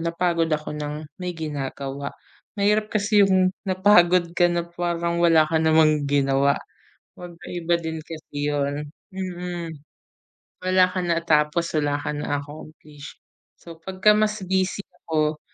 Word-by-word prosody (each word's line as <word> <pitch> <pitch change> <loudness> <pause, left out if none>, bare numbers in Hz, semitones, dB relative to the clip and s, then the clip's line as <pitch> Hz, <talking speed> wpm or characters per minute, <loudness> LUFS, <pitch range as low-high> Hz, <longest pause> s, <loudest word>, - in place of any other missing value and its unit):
napagod 170 0 0
ako 150 0 -2
nang 150 +1 -5 0.2
may 180 0 -3
ginagawa. 140 -2 -4 0.5
Mahirap 210 +1 +2
kasi 210 0 +3
'yong 185 -1 +3 0.2
napagod 180 -3 +4
ka 175 0 +5
na 175 -1 -1
parang 170 0 -2
wala 165 -2 +5
ka 160 - 0
namang 155 -2 +4
ginawa. 140 0 +2 0.6
Magkaiba 175 -1 -3
din 160 -1 -4
kasi 150 -2 -5
'yon 145 +1 -2 0.2
mm. 180 -3 -5 0.9
Wala 185 0 +4
kang 180 -2 -2
natapos, 165 0 +1
wala 145 -1 0
ka 145 - -3
na-accomplish. 145 +1 -7 0.4
So 165 -1 -12
'pagka 190 +4 +3
mas 215 0 +1
busy 190 +1 0 0.2
ako, 155 -1 0
170 Hz, 125 wpm, -23 LUFS, 150-180 Hz, 0.9 s, ka